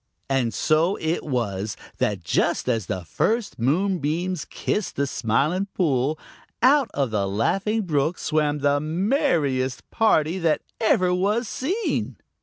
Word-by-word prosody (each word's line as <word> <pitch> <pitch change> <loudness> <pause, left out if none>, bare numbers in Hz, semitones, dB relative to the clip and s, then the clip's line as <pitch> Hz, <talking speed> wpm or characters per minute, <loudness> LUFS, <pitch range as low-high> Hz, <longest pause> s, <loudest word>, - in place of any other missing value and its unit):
And 130 -4 +1
so 160 - +2
it 160 +2 -1
was 105 -7 -2 0.2
that 100 -4 0
just - - 0
as 115 -7 0
the 90 -2 -4
first 215 - -1
moonbeams 170 - 0
kissed 210 - -3
the 140 - +1
Smiling 140 - 0
Pool, 145 -3 +1 0.5
out 275 0 +5
of 135 -5 0
the 100 -2 0
Laughing 195 - 0
Brook 155 -1 0
swam 150 -2 0
the 145 0 +3
merriest 155 - 0
party 180 -6 +2
that 165 -3 +1 0.2
ever 185 -5 +3
was 205 +6 +1
seen. 375 - -2
155 Hz, 130 wpm, -24 LUFS, 130-195 Hz, 0.5 s, out